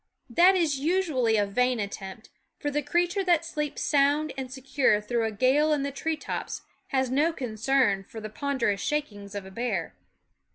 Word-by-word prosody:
That 360 +9 +6
is 315 -7 +1
usually 290 -9 +1
a 205 - +3
vain 250 +4 +1
attempt; 200 +1 -6 0.3
for 290 - -3
the 295 +1 0
creature 350 +6 0
that 345 -3 +2
sleeps 300 -3 -3
sound 290 +1 +2
and 260 -2 -5
secure 265 -4 +1
through 230 +2 -1
a 220 - -1
gale 265 +8 +3
in 290 -2 0
the 280 - -2
tree 315 +3 -2
tops - - -5 0.2
has 260 -2 0
no 295 +5 +3
concern 240 -5 +1
for 220 - -10
the 215 - -6
ponder 260 +1 -1
ous 200 - -3
shakings 215 -10 -3
of 200 -1 -5
a 190 - -11
bear. 200 -6 -2
265 Hz, 180 wpm, -27 LUFS, 215-300 Hz, 0.3 s, That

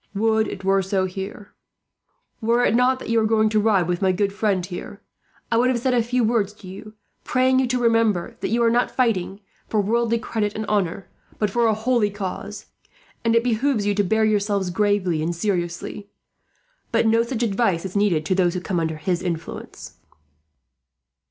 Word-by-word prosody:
Would 220 +1 +2
it 190 - -7
were 195 0 +3
so 190 0 0
here. 195 +2 -7 0.9
"Were 235 +2 +2
it - - +2
not 250 +2 +3
that 260 - -9
you 230 0 +3
are 220 - +2
going 220 0 +3
to 215 0 +2
ride 205 -5 +2
with 175 -1 -1
my 190 -1 +3
good 195 +2 0
friend 200 -4 0
here, 180 -1 -8 0.5
I 230 - +3
would 250 +2 +3
have 255 - +1
said 255 +2 0
a 240 - +3
few 245 +2 0
words 215 -3 +1
to 210 -3 -14
you; 210 +3 -10 0.3
praying 260 +1 +2
you 260 - +1
to 250 +1 0
remember 230 -3 +1
that - - -2
you 235 +1 +1
are 235 +1 +3
fighting, 225 -8 0
not 200 - -18 0.3
for 215 - +1
worldly 230 +3 +1
credit 215 -2 -2
and 220 - -3
honour, 195 -3 -1 0.3
but 210 -2 0
for 235 +2 +2
a 220 - +2
holy 225 -1 +1
cause, 205 +1 -6 0.6
and 230 0 +2
it 230 - +4
behoves 245 -1 0
you 205 - +2
to 205 0 +1
bear 220 +3 +2
yourselves 205 -3 0
gravely 195 -5 +1
and 170 +2 -2
seriously. 180 +1 -3 0.8
But - - +2
no 225 +1 +4
such 235 0 -2
advice 195 -5 0
is 190 - -6
needed 190 -7 +2
to 185 - +1
those 180 -1 +1
who - - -1
come 180 -1 -2
under 160 -1 -2
his 175 +3 -1
influence." 170 -3 -6
210 Hz, 195 wpm, -22 LUFS, 190-230 Hz, 0.9 s, it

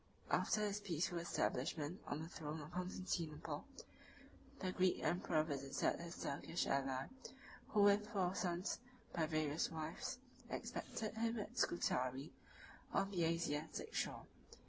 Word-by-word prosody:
After 215 - +3
his 210 -1 +1
peaceful 175 -3 0
establishment 155 0 0
on 150 +2 -1
the - - -5
throne 155 -2 -4
of 150 +1 -7
Constantinople, 180 -3 -2 0.9
the 185 - -1
Greek 185 0 +3
emperor 170 -3 +3
visited 140 -3 0
his 170 0 -5
Turkish 145 +4 0
ally, 135 -1 +1 0.6
who 210 -2 +5
with 205 +1 +6
four 190 -5 +2
sons, 180 0 0 0.3
by 160 -2 +2
various 155 -1 +1
wives, 165 +11 -3 0.3
expected 215 -2 -3
him 225 +1 +1
at 215 +3 -4
Scutari, 130 -2 +1 0.6
on 195 - +2
the 175 -4 +2
Asiatic 160 -2 -1
shore. - - -1
170 Hz, 125 wpm, -41 LUFS, 150-190 Hz, 0.9 s, with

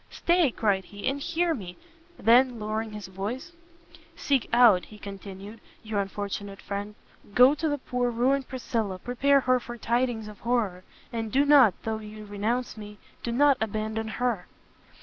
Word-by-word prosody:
"Stay," 345 -3 +2
cried 200 -5 0
he, 205 +4 -6
"and 275 +1 -1
hear 340 +2 0
me!" 185 - -7 0.4
then, 245 +1 +4
lowering 215 +1 -3
his 210 -2 -7
voice, 205 - -5 0.6
"seek 275 -4 0
out," 230 -7 +6
he 215 - -14
continued, 200 +1 -9 0.2
"your 215 -2 -2
unfortunate 200 0 -5
friend, 205 +1 -5 0.4
go 250 +3 +7
to 310 +1 -1
the 290 - 0
poor 250 -2 -1
ruined 255 +3 +1
Priscilla, 225 -6 -3
prepare 265 +6 +2
her 255 0 +3
for 240 0 -8
tidings 235 -1 0
of 210 -2 -11
horror! 220 -7 -1 0.3
and 225 -2 -3
do 275 +5 +3
not, 270 -10 +6
though 220 -1 -2
you 215 0 -10
renounce 215 +5 -2
Me, 210 -1 -9 0.2
do 235 - -3
not 280 +2 +4
abandon 220 +1 -2
Her!" 230 -4 -2
225 Hz, 160 wpm, -27 LUFS, 205-255 Hz, 0.6 s, go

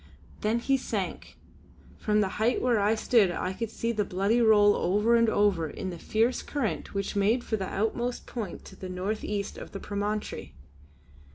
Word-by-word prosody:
Then 215 +2 +1
he 270 +3 +2
sank; 260 - -4 0.6
from 210 0 +2
the 200 - +2
height 235 +3 +3
where 245 -3 +2
I 205 +2 +3
stood 220 -3 +4
I 185 +2 -2
could 230 +3 -4
see 230 +1 -2
the 215 -2 0
body 200 +6 +1
roll 210 -2 +6
over 210 +5 +2
and 230 -1 +4
over 200 -7 +2
in 185 - -5
the 170 - -8
fierce 225 +7 +1
current 260 -7 -3
which 200 +1 -2
made 215 +5 +2
for 220 - -1
the 190 -3 -3
outmost 235 +4 -1
point 215 -8 -6
to - - -12
the 185 - -7
north 190 +4 -3
east 205 -1 -3
of - - -10
the 195 - -5
promontory. 205 +1 -4
210 Hz, 185 wpm, -28 LUFS, 200-230 Hz, 0.6 s, roll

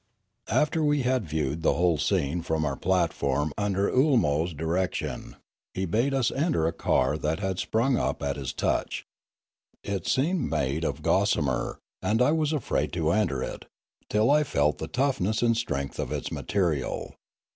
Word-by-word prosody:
After 150 +6 +2
we 145 -2 +2
had 125 -6 0
viewed 75 0 -1
the - - +2
whole 85 -3 +2
scene 70 +6 0
from 80 -1 -1
our 70 -2 -1
plat 90 +1 +1
form 70 +2 -1
under 100 -1 0
Oolmo's 105 - +2
direction, 80 +3 -2 0.4
he 95 - -1
bade 115 +10 +1
us 135 -3 +1
enter 145 - +1
a 80 - 0
car 65 +2 +1
that 75 +4 -1
had 95 -2 -2
sprung 120 +3 +1
up - - -1
at 70 -1 -1
his 65 -3 -4
touch. - - -1 0.8
It 100 -3 -3
seemed 160 +6 +1
made 70 +4 -1
of - - 0
Fialume - - -17 0.3
69 75 - +1
gossamer, 65 -2 -2 0.2
and 105 +4 +1
I 125 +4 +4
was 155 -1 +1
afraid 150 -6 -1
to 80 -2 +1
enter 85 -10 +1
it, - - -6 0.4
till 110 +5 +3
I 150 +1 +5
felt 75 - +1
the 80 - -4
toughness 120 - 0
and 115 -1 +3
strength 70 -12 -3
of - - -3
its - - -3
material. 85 -10 -1
90 Hz, 175 wpm, -27 LUFS, 75-125 Hz, 0.8 s, I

